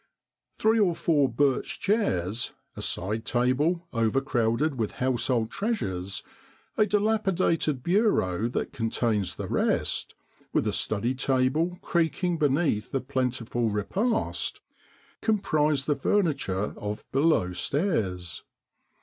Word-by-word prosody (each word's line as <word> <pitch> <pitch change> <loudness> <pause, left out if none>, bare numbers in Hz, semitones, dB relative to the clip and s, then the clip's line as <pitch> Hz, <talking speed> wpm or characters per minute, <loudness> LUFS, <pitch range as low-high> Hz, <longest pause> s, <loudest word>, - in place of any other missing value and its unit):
Three 220 +1 +3
or 180 -5 +3
four 145 -6 +2
birch 135 +2 0
chairs, 120 - 0 0.2
a - - -6
side 105 +5 -1
table 145 +9 +1
overcrowded 120 +3 +1
with 110 - -1
household 125 -2 0
treasures, 100 - -2 0.5
a 215 - +3
dilapidated 190 - +1
bureau 145 - +2
that - - -3
contains 115 -4 0
the - - -5
rest, - - 0 0.4
with - - +2
a - - 0
sturdy 115 +4 0
table 135 +7 +1
creaking 170 +1 0
beneath 145 -7 +1
a - - +3
plentiful 125 -3 -1
repast, 200 - -1 0.6
comprise 155 - +1
the 150 - +1
furniture 135 - 0
of 105 +1 -5
below 135 - +2
stairs. 95 - -1
135 Hz, 105 wpm, -27 LUFS, 115-175 Hz, 0.6 s, Three